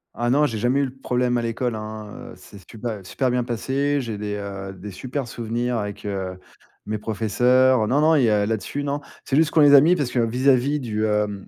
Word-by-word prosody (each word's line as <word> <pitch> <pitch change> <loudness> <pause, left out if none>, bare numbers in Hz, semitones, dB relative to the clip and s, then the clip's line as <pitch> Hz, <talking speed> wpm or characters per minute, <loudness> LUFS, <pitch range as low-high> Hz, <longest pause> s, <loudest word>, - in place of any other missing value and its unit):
Ah 120 0 0
non, 150 +2 +4
j'ai 115 - -4
jamais 125 +6 +1
eu 140 - +2
le 130 0 -8
problème 125 -1 0
à 120 - -1
l'école, 115 0 -2
hein, 110 -1 -8
heu, - - -11
c'est 100 - -14
super 110 -4 -6
super 125 +8 -1
bien 125 0 0
passé, 135 +4 -1
j'ai 115 -4 -5
des, 105 0 -4
heu, 100 -1 -6
des 95 +2 -9
super 130 +6 -5
souvenirs 120 +1 -2
avec, 105 -1 -5
heu, 95 -2 -4 0.5
mes 105 0 -2
professeurs. 120 +3 +2
Non, 140 +5 +2
non, 160 +1 +4
il 135 - +3
y 115 - +4
a 105 -1 +2
là-dessus, 110 +6 -3
non, 145 +1 -2 0.2
c'est 135 - -2
juste 160 +1 +3
qu'on 160 - +2
les 145 -1 +8
a 135 - +9
mis 175 +4 +4
parce 140 -6 -1
que 125 - -4
vis-à-vis 130 +4 +2
du, 110 -4 -2
hem, 105 -2 -1
120 Hz, 230 wpm, -23 LUFS, 105-135 Hz, 0.5 s, a